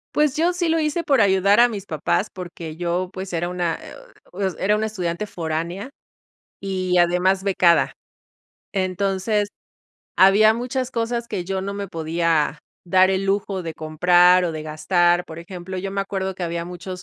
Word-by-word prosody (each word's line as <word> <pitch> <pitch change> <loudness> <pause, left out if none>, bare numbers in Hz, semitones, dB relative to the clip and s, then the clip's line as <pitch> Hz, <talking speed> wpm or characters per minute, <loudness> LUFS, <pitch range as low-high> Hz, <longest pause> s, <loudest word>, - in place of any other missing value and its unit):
Pues, 300 -3 +2
yo 340 +3 +2
sí 345 -2 -1
lo 325 0 +2
hice 315 +2 -1
por 275 -6 +3
ayudar 200 +2 +4
a 245 - +7
mis 205 -4 -6
papás, 160 +6 -1
porque 170 -3 -8
yo 175 +2 -2
pues 190 -1 -7
era 175 +1 -1
una, 175 -2 -2
eh, - - -11 0.6
era 205 +2 +2
una 215 +1 -1
estudiante 185 -3 -3
foránea 170 +4 -4 0.7
y 185 -2 -1
además 180 +2 +2
becada. 180 -3 +3 0.8
Entonces 195 +2 0 0.7
había 200 +3 +6
muchas 250 +2 -3
cosas 235 0 -2
que 190 -6 -4
yo 190 0 -2
no 200 +1 -4
me 200 0 -5
podía 165 -2 0 0.3
dar 185 +1 +4
el 190 0 0
lujo 195 -1 -1
de 165 -1 -5
comprar 175 +4 +4
o 170 - -1
de 155 -1 -5
gastar, 175 +3 +1
por 160 - -10
ejemplo, 180 +2 -7
yo 195 +1 -4
me 195 0 -2
acuerdo 190 -1 -3
que 180 - -7
había 170 0 -3
muchos 180 +1 -7
185 Hz, 170 wpm, -22 LUFS, 175-200 Hz, 0.8 s, a